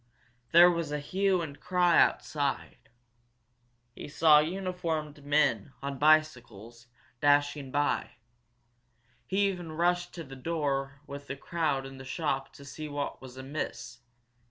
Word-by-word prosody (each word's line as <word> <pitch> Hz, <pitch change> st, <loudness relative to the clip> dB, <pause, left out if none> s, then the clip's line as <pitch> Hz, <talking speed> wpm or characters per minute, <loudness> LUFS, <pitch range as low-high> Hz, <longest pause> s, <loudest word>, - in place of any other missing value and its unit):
There 175 Hz, +1 st, +8 dB
was 170 Hz, -3 st, -3 dB
a 150 Hz, -, -1 dB
hue 185 Hz, +4 st, 0 dB
and 145 Hz, -3 st, -8 dB
cry 180 Hz, -2 st, +3 dB
outside. 145 Hz, -3 st, -1 dB, 1.0 s
He -, -, -9 dB
saw 150 Hz, 0 st, +5 dB
uniformed 165 Hz, -3 st, -3 dB
men, 140 Hz, -5 st, +1 dB
on 140 Hz, -1 st, -4 dB
bicycles, 120 Hz, -7 st, +1 dB, 0.3 s
dashing 145 Hz, -1 st, +2 dB
by. 145 Hz, +2 st, -1 dB, 1.1 s
He 200 Hz, +1 st, +2 dB
even 175 Hz, -4 st, -5 dB
rushed 175 Hz, +2 st, 0 dB
to 170 Hz, -, -6 dB
the 135 Hz, -2 st, -11 dB
door 135 Hz, -2 st, -2 dB
with 140 Hz, 0 st, -9 dB
the 140 Hz, -, -4 dB
crowd 150 Hz, -4 st, -1 dB
in 135 Hz, 0 st, -10 dB
the -, -, -8 dB
shop 135 Hz, 0 st, -3 dB
to 140 Hz, -, -13 dB
see 150 Hz, +3 st, -7 dB
what 145 Hz, -1 st, -4 dB
was 130 Hz, -1 st, -11 dB
amiss! 130 Hz, -3 st, -6 dB
145 Hz, 130 wpm, -29 LUFS, 135-170 Hz, 1.1 s, There